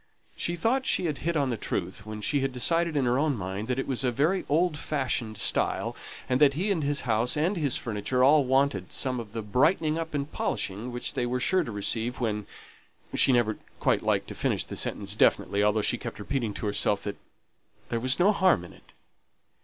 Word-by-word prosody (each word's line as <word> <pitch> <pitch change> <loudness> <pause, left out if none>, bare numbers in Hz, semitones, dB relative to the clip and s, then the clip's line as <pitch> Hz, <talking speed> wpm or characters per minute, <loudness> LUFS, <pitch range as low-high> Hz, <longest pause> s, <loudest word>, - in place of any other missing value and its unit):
She 170 - -2
thought 255 +9 0
she - - +1
had 150 -4 -2
hit 165 +4 -1
on 140 -3 +1
the 115 - -2
truth 100 - -4
when 110 0 -6
she 145 +7 0
decided 165 +5 0
in 135 - +2
her 125 +2 +2
own 150 -2 +1
mind 95 +2 -4
that 125 0 -1
it 135 - -1
was 135 -1 -1
a 130 - +2
very 155 +10 +1
old 165 +2 +2
fashioned 130 -7 -2
style, - - 0 0.3
and 130 +2 +1
that 140 -2 +6
he 195 +6 0
and 175 -5 0
his 145 -1 -1
house 115 +3 0
and 170 +7 +1
his 150 -7 +1
furniture 120 +3 -1
all 145 +2 +6
wanted 130 -8 +1
some 130 -2 0
of 110 -3 -8
the 115 - -4
brightening 155 - +2
up 165 -2 -4
and 145 +1 -3
polishing 105 +6 -3
which 120 0 -3
they 120 - -1
were 125 +1 -1
sure 185 +8 +2
to 120 - -6
receive, 110 +4 -2
when 105 -4 -2 0.7
she - - +4
never 120 -4 +2 0.2
quite - - +2
liked - - 0
to - - -5
finish - - -1
the - - -7
sentence - - -1
definitely, 100 - +2
although 105 0 +2
she - - 0
kept - - -6
repeating 120 -6 -2
to - - -4
herself 105 0 +1
that 100 - -4 0.7
"there 115 - -1
was 130 +3 +1
no 190 +4 +5
harm 185 - +3
in - - -13
it." - - -21
130 Hz, 215 wpm, -27 LUFS, 110-155 Hz, 0.7 s, that